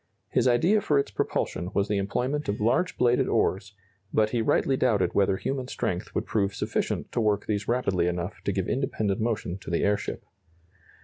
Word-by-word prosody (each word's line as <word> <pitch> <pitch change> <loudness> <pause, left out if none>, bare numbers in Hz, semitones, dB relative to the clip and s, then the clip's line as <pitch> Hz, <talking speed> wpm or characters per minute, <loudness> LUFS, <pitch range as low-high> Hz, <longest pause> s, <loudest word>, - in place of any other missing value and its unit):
His - - +2
idea 170 - +4
for 150 - +2
its 140 - 0
propulsion 90 - -2
was 100 +1 +2
the 105 -1 0
employment 125 +9 -1
of 100 - -1
large 175 +12 +1
bladed 125 0 +3
oars, 100 +1 0 0.4
but 110 0 +2
he 120 - +1
rightly 135 +2 +2
doubted 110 -7 +2
whether 95 -1 +2
human 130 +2 -3
strength - - -3
would - - 0
prove 100 -2 0
sufficient - - -2
to 120 - 0
work 105 -2 +1
these 105 -1 -2
rapidly 100 -8 +1
enough 90 +3 -3
to - - +1
give 95 -1 -2
independent 110 -6 -1
motion 110 -5 -2
to - - -9
the 85 - 0
airship. 105 0 -1
105 Hz, 185 wpm, -27 LUFS, 100-125 Hz, 0.4 s, idea